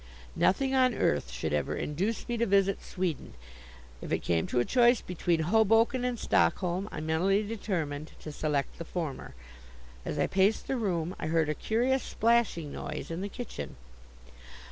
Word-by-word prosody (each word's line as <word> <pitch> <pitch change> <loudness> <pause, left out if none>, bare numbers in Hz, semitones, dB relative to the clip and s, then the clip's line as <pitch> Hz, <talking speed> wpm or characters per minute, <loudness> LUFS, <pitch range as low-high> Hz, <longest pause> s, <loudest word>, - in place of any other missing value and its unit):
Nothing 265 +7 +2
on 255 -3 +4
earth 70 -3 +1
should 70 +5 -3
ever 75 - 0
induce 190 +10 -2
me 240 - -1
to 235 - +1
visit 195 0 +2
Sweden. 175 - -3 0.7
If - - -7
it - - 0
came 85 -2 +1
to 125 - 0
a 120 - +2
choice 240 -1 +4
between 175 -2 -1
Hoboken 225 +7 +3
and 250 -1 -1
Stockholm, 185 -1 +1
I - - -5
mentally 180 +6 +2
determined 170 -9 -3
to 155 - -7
select 145 -2 -2
the - - -3
former. 160 - -5 0.7
As - - -4
I - - +2
paced 195 +3 +2
the 270 - -1
room 180 -5 -1
I - - -3
heard 160 -1 +2
a - - +1
curious 245 - +1
splashing 225 -12 +1
noise - - -5
in 165 +2 -3
the 200 - -3
kitchen. 245 +4 -7
185 Hz, 165 wpm, -29 LUFS, 155-225 Hz, 0.7 s, on